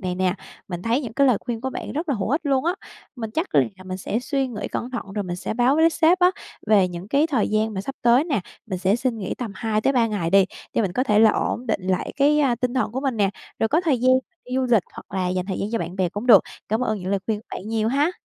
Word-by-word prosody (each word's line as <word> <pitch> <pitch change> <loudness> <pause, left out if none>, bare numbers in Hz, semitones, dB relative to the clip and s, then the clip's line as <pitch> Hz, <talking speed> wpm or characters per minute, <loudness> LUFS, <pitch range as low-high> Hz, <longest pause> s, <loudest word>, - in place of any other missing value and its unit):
này 185 -2 -2
nè. 185 0 +1 0.3
Mình 175 -1 -5
thấy 235 +4 +1
những 240 -6 -6
cái 280 +4 +3
lời 250 -5 +4
khuyên 230 -2 -4
của 265 +1 -3
bạn - - -6
rất 315 +3 -3
là 280 - +2
hữu 205 -1 -2
ích 295 +4 +2
luôn 270 -1 +2
á. 345 +2 +1 0.4
Mình 225 -3 -5
chắc 320 - -3
là - - +4 0.2
mình 185 0 -5
sẽ 210 - -2
suy 270 +1 -1
nghĩ 210 -4 -5
cẩn 245 - -4
thận 230 -6 -6
rồi 205 -1 -2
mình 175 -1 -4
sẽ 180 - -4
báo 245 +4 +3
với 325 +1 +5
sếp 330 +3 +3
á 360 0 +5 0.4
về 205 -4 +4
những 180 +3 -8
cái 285 +5 +3
thời 265 -9 0
gian 215 0 0
mà 190 - -2
sắp 275 +8 -6
tới 240 +5 +5
nè. 280 - 0 0.3
Mình 190 -4 -3
sẽ 195 +4 +2
xin 245 -2 -1
nghỉ 190 - -3
tầm 235 -5 -5
2-3 230 +4 +1
ngày 200 -6 -2
đi 195 0 +6 0.3
để 230 - +2
mình 190 - -1
có 255 +7 0
thể 210 -5 +3
là 220 0 +7
ổn 245 +3 -2
định 220 -3 0
lại 185 -1 -1
cái, 295 +2 +4
a, 270 -4 +3
tinh 245 +1 -2
thần 255 - 0
của 260 - -2
mình 270 -4 -1
nè, 200 -2 +2 0.3
rồi 225 - +1
có 315 +7 +3
thời 305 -8 +1
gian 255 +1 +4 0.3
đi 250 - -10
du 260 - +1
lịch 220 -6 +5
hoặc - - -10
là 180 -1 0
dành 185 0 -2
thời 195 - -3
gian 200 - -2
cho 230 - +1
bạn 175 +2 -5
bè 185 -2 +1
cũng 205 +7 -6
được. 220 -6 +8 0.3
Cảm 220 +3 0
ơn 220 -4 0
những 185 +2 -4
lời 200 - +2
khuyên 215 -2 -1
của - - -27
bạn 205 - -8
nhiều 220 -1 0
ha! 285 +7 +2
225 Hz, 295 wpm, -23 LUFS, 195-265 Hz, 0.4 s, được